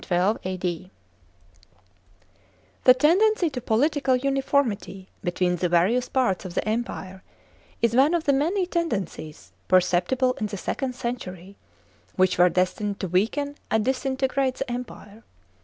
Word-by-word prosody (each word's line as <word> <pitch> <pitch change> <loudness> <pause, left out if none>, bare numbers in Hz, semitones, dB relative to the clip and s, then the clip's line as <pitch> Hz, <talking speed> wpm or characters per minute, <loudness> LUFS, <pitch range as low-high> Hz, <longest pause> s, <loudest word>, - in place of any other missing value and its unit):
(4) 185 +4 +1
The 185 -1 -4 2.1
tendency 360 +5 +3
to 250 -3 -5
political 270 +4 +1
uniformity 265 -7 -1
between 180 0 0
the 180 +1 0
various 205 +9 +2
parts 245 -8 0
of 180 -2 -8
the - - -1
Empire 205 -4 -4 0.6
is 230 -1 +3
(1) - - +5
one 310 - 0
of 335 - -1
the 280 - +2
many 340 +8 +1
tendencies, 195 - -4 0.2
perceptible 185 +8 +2
in 215 - -1
the 205 -1 -6
second 255 +6 -3
century, 200 -7 -6 0.6
which 185 -2 +2
were 180 0 +6
destined 185 +3 -1
to 190 - -3
weaken 230 - 0
and 220 0 +1
disinte 265 0 0
grate 260 -1 0
the 270 -2 -4
empire. 225 -3 -8
225 Hz, 135 wpm, -25 LUFS, 185-270 Hz, 2.1 s, were